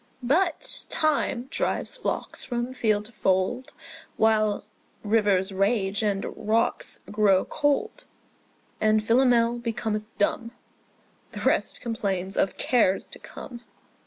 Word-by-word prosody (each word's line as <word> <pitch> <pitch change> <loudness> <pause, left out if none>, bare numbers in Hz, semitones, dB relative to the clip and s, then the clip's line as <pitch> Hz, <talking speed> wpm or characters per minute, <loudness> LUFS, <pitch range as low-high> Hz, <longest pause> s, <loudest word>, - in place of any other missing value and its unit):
But 340 - 0
Time 300 -5 +1
drives - - -1
flocks - - -3
from 240 +1 -3
field 215 -4 +1
to 230 - -11
fold, 195 +4 0 0.4
When 215 -2 +2 0.4
rivers 205 -3 +2
rage 195 +1 +1
and 200 -2 0
rocks 220 +2 -1
grow 205 -3 +3
cold; 420 - -1 0.8
And 215 0 +3
Philomel 240 0 +3
becometh 225 -2 -2
dumb; 230 +3 0 0.8
The - - -6
rest - - +1
complains 195 -5 -2
of 190 - 0
cares 205 -6 +2
to - - -9
come. 240 -2 -10
220 Hz, 110 wpm, -26 LUFS, 205-245 Hz, 0.8 s, grow